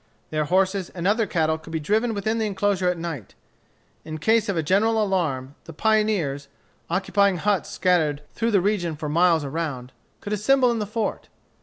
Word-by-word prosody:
Their 155 -1 0
horses 190 +2 +1
and 175 -1 -4
other 215 +2 +2
cattle 160 -2 0
could 160 - -13
be 160 0 -2
driven 220 +8 0
within 220 +3 -1
the 220 - 0
enclosure 195 -2 0
at 180 - -1
night. 165 - -6 0.7
In 155 0 -6
case 220 +6 +2
of 195 - -1
a 160 - +1
general 215 +7 +2
alarm, 160 -10 -1
the 165 - -10
pioneers, 205 -8 +1 0.4
occupying 200 0 +2
huts 200 +2 0
scattered 155 -5 +1
through 230 0 0
the 200 -4 +3
region 180 -5 0
for 150 0 -5
miles 165 0 +3
around, 140 -4 -4 0.3
could 205 - -5
assemble 250 +5 +3
in 230 - -1
the 210 - -3
fort. 220 +1 -3
185 Hz, 180 wpm, -24 LUFS, 160-210 Hz, 0.7 s, the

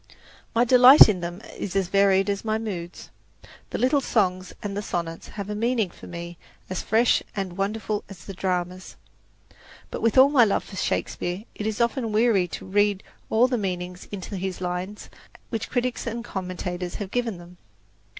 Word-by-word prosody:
My 235 +2 +4
delight 250 +3 +9
in 205 -4 0
them 175 +3 -6
is 195 - -5
as 190 -2 +1
varied 195 0 +4
as 200 -1 -1
my 220 -1 0
moods. 180 -6 -6 0.6
The - - -3
little 275 +3 +2
songs 185 -7 0
and 200 -1 -4
the 205 - -2
sonnets 170 -4 -4
have 200 -1 -4
a 210 - -3
meaning 225 -3 0
for - - -13
me 170 0 -8 0.3
as 185 - -2
fresh 225 +3 +3
and 190 -3 -3
wonderful 210 +2 -2
as 185 -5 -12
the 195 - -7
dramas. 185 0 -3 1.0
But, - - -5
with 230 +2 +2
all 265 +2 +8
my 275 -5 +6
love 205 - +1
for 195 - -11
Shakespeare, 180 0 -2
it 210 - -4
is 220 -1 -2
often 235 -1 0
weary 215 -3 +3
work 175 - -14
to - - -6
read 205 0 +1 0.3
all 235 +3 +4
the 250 -2 -1
meanings 180 -2 -4
into 200 0 -5
his 185 0 -4
lines 180 +3 -4 0.4
which 225 -1 -3
critics 250 -1 -1
and 235 +1 -4
commentators 180 -2 -4
have 200 -2 -5
given 240 -5 -1
them. 175 +1 -14
200 Hz, 180 wpm, -25 LUFS, 180-225 Hz, 1.0 s, delight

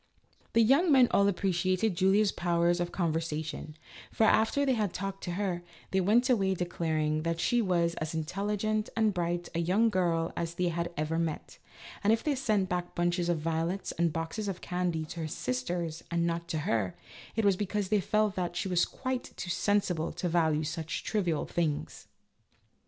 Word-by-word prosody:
The 230 - +5
young 285 +9 +4
men 260 -3 +7
all 200 - +4
appreciated 185 +1 +1
Julia's 195 +3 +3
powers 175 0 +1
of 175 0 -2
conversation, 160 -3 -2 0.4
for, - - +1
after 220 +6 +3
they 265 - +3
had 210 -6 -1
talked 195 0 -4
to 175 - -3
her, 185 -2 -1 0.3
they 190 - +2
went 225 +7 +3
away 195 -7 +2
declaring 160 -3 -1
that 165 +1 -2
she 240 +7 +2
was 170 -4 +1
as 155 +1 -3
intelligent 205 +6 -1
and 220 -2 +3
bright 175 -1 -2
a 170 - 0 0.3
girl 170 -4 0
as 170 0 -3
they 180 0 +1
had 170 +1 -2
ever 155 +2 -1
met, 165 -2 -4 0.4
and 205 - +4
if 225 - +2
they 300 - +1
sent 215 -8 +1
back 180 -1 -3
bunches 175 0 +1
of 165 -3 0
violets 165 +4 -1
and 170 -1 +1
boxes 165 +7 -3
of 190 -2 -3
candy 180 -3 -2
to 165 +2 -8
her 160 - -2
sisters 155 +5 -3
and 170 0 +1
not 170 0 -2
to 165 - -2
her, 105 -10 0 0.4
it 225 -1 +1
was 200 -2 +5
because 205 0 -2
they 210 -1 +3
felt 215 +2 +1
that 175 -3 -3
she 175 - -1
was 180 -2 +3
quite 260 -1 -4
too 175 - -4
sensible 180 -4 +1
to 175 +2 -3
value 160 -3 +2
such 160 +1 -4
trivial 180 -8 0
things. 160 -4 -2
175 Hz, 180 wpm, -30 LUFS, 165-205 Hz, 0.4 s, men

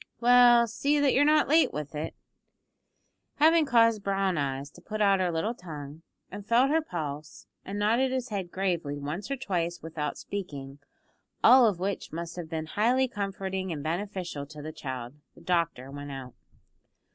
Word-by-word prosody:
"Well, 240 0 +6
see 280 +6 0
that 285 -2 +3
you're 280 - +4
not 305 0 +4
late 320 +3 +4
with 150 0 -6
it." 155 +2 -5 1.2
Having 320 0 +4
caused 230 -4 +4
Brown 195 -1 0
eyes 140 -1 -3
to 175 - -16
put 215 +4 -6
out 200 -2 +4
her 180 -2 +1
little 170 +8 -1
tongue, 155 - -9 0.3
and 205 +1 -7
felt 240 +6 +3
her 320 +1 +3
pulse, 155 - -6 0.2
and 200 +1 -6
nodded 230 +6 +2
his 260 -1 -2
head 195 -4 -4
gravely 175 -6 -2
once 150 - -5
or 275 - -2
twice 175 -8 -2
without 155 -2 -4
speaking, 145 -9 -7 0.6
all 250 -1 +8
of 200 -5 0
which 195 +1 -3
must 170 +1 -6
have 175 -3 -7
been 160 -1 -3
highly 240 +9 +2
comforting 195 -4 -4
and 150 -3 -4
beneficial 175 -3 -4
to 150 +1 -11
the 155 +1 -6
child, 130 -3 -6 0.2
the - - -16
doctor 165 -6 -1
went 145 0 -7
out. 130 -2 -8
185 Hz, 170 wpm, -28 LUFS, 155-230 Hz, 1.2 s, all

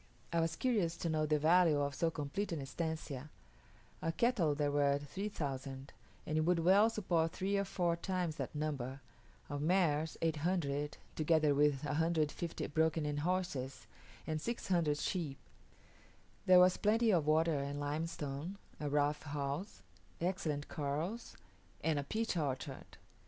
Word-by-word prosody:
I 170 - +3
was 165 0 0
curious 205 -10 +1
to 170 - -2
know 155 -1 +1
the 150 0 +3
value 160 0 +5
of 140 0 0
so 165 +4 +1
complete 165 +6 -3
an 165 - -2
estancia. 150 -1 -4 0.7
Of 165 0 -2
cattle 200 -12 +2
there 145 -1 +1
were 140 -1 +3
3000, 140 -5 -5 0.3
and 155 - -1
it - - +3
would 175 +2 +3
well 190 +6 +5
support 175 -7 0
three 195 +2 -1
or 200 0 +1
four 175 -3 0
times 175 -2 -2
that - - -4
number; 140 -3 -3 0.5
of 145 0 -4
mares 160 -2 +2
800, 150 -3 0 0.2
together 155 -1 +3
with 145 -1 +3
150 160 +1 0
broken 160 +1 +1
in 145 0 -1
horses, 145 -6 -2 0.4
and 155 -1 -2
600 175 -9 0
sheep. 155 -5 -2 1.1
There 185 -1 +8
was 180 0 +6
plenty 220 +2 +3
of 165 -6 +2
water 155 -1 +3
and 140 +1 -3
limestone, 150 +3 -3 0.2
a 150 - -2
rough 145 +1 +1
house, 145 - -4 0.4
excellent 165 -5 -1
corrals, 160 +9 -3 0.5
and 160 -3 +2
a - - -2
peach 220 +8 -1
orchard. 135 -3 -3
155 Hz, 145 wpm, -35 LUFS, 145-175 Hz, 1.1 s, There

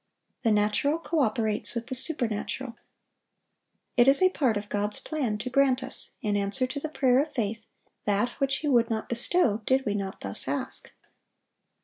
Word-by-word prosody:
The 230 - +2
natural 210 +9 +2
co 330 -1 -2
operates 220 -3 0
with 235 0 -3
the 260 - -5
supernatural. 245 -3 -2 1.2
It 240 0 +5
is 275 +1 +8
a 370 0 +4
part 255 - +1
of 205 0 -5
God's 205 0 -2
plan 260 -9 -2
to 235 +4 -4
grant 265 -1 +3
us, - - 0
in 210 -2 0
answer 205 +6 0
to 260 +3 -5
the 310 - -4
prayer 260 -3 +3
of 305 +1 -4
faith, 225 -1 -2 0.4
that 205 +3 +1
which 275 -1 +1
He 300 - -3
would 240 -4 +3
not 220 -1 -3
bestow 235 - +1
did 265 +1 +2
we 205 - 0
not 195 -2 -4
thus 100 0 -4
ask. - - -4
240 Hz, 175 wpm, -27 LUFS, 210-275 Hz, 1.2 s, is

